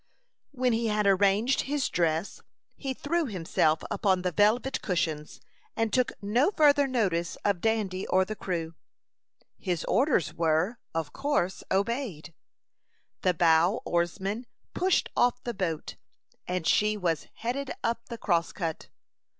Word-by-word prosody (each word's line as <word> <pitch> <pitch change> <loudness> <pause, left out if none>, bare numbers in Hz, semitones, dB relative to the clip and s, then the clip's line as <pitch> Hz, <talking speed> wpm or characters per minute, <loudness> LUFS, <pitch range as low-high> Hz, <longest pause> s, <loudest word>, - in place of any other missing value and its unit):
When 255 -4 0
he 230 0 0
had 210 -1 +1
arranged 200 +6 +3
his 290 -2 +1
dress, 165 +2 -1 0.3
he 270 - -4
threw 315 +4 -1
himself 165 -5 +1
upon 190 -3 +1
the 180 - 0
velvet 225 - +2
cushions, 160 -5 -2 0.4
and 225 -2 -1
took 255 -2 +2
no 235 - +3
further 290 -6 +4
notice 190 -10 0
of 200 -4 +1
Dandy 210 -4 0
or 190 0 +3
the 215 - -5
crew. 165 -5 -3 0.9
His 175 -5 -2
orders 255 - +2
were, 170 +8 +1 0.2
of 165 -2 -2
course, 275 -10 -1
obeyed. 195 - -2 0.9
The 185 -1 +2
bow 165 +5 +3
oarsman 190 +7 -1 0.3
pushed 370 +1 +2
off 245 0 +2
the 240 - -3
boat, 180 -6 -3 0.5
and 180 -2 -2
she 210 +4 +3
was 170 -5 -1
headed 260 +4 -3
up 230 +1 -2
the 235 - -5
Crosscut. 170 -4 -1
200 Hz, 135 wpm, -28 LUFS, 175-245 Hz, 0.9 s, further